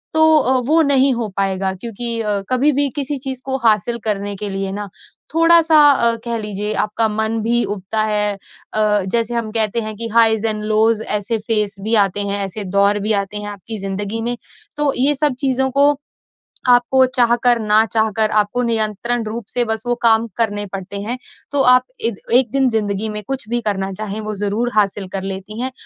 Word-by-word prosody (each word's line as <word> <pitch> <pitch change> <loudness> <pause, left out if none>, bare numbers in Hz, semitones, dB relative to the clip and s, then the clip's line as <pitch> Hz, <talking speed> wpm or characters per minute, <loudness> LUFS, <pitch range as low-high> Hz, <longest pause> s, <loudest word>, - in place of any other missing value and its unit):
तो 315 0 +5
अ, 260 -2 +2
वो 320 +3 +4
नहीं 275 -2 +3
हो 235 -2 -3
पाएगा, 190 -1 0
क्योंकि 230 +3 -2
अ, 210 -2 -1
कभी-भी 280 +2 +2
किसी 285 +1 -2
चीज़ 265 -1 -5
को 265 0 -2
हासिल 220 +2 +2
करने 205 -1 -2
के 205 0 -4
लिए 195 0 -4
ना 205 0 -6 0.5
थोड़ा-सा 330 -1 +5
अ, 235 -4 +2
कह 235 -1 -2
लीजिए 210 0 -3
आपका 220 +1 0
मन 220 +1 -2
भी 235 +1 +1
उबता 205 +2 -2
है। 210 -1 0 0.4
अ, 210 -1 +2
जैसे 235 0 0
हम 225 -2 -3
कहते 220 0 +1
हैं 215 -1 -6
कि 230 0 -2
हाईज़ 225 -1 +3
एंड 215 -1 -3
लोज़ 220 0 +2
ऐसे 210 +2 -2
फेज़ 210 -3 -1
भी 225 +1 +1
आते 205 +2 -4
हैं, 200 0 -2
ऐसे 205 +2 -6
दौर 200 +1 +3
भी 220 - +3
आते 210 +1 -7
हैं 205 0 -6
आपकी 205 +2 -7
ज़िंदगी 200 +3 -4
में। 240 +1 -3 0.4
तो 295 -1 +1
ये 280 +3 +4
सब 290 -1 +1
चीज़ों 265 -1 0
को 290 +1 +5 0.8
आपको 250 +2 +4
चाह 240 -1 +4
कर 240 -1 +5
ना 215 +1 +4
चाहकर 220 -1 +2
आपको 210 +4 0
नियंत्रण 230 +1 0
रूप 225 +2 -5
से 245 - +2
बस 220 -1 -2
वो 240 - +1
काम 225 -1 +4
करने 205 -3 0
पड़ते 195 +1 -6
हैं, 225 +5 -3 0.4
तो 285 - +1
आप 250 -1 +5 0.3
एक 205 - -6 0.2
एक 250 -3 +4
दिन 270 -1 +2
जिंदगी 215 -2 -1
में 210 0 -4
कुछ 270 -5 -3
भी 240 0 -1
करना 195 -1 -2
चाहें 215 +2 -5
वो 215 0 -5
ज़रूर 210 +4 -1
हासिल 200 -1 +1
कर 195 - -2
लेती 195 +3 -6
हैं। 260 - -2
220 Hz, 195 wpm, -18 LUFS, 205-245 Hz, 0.8 s, तो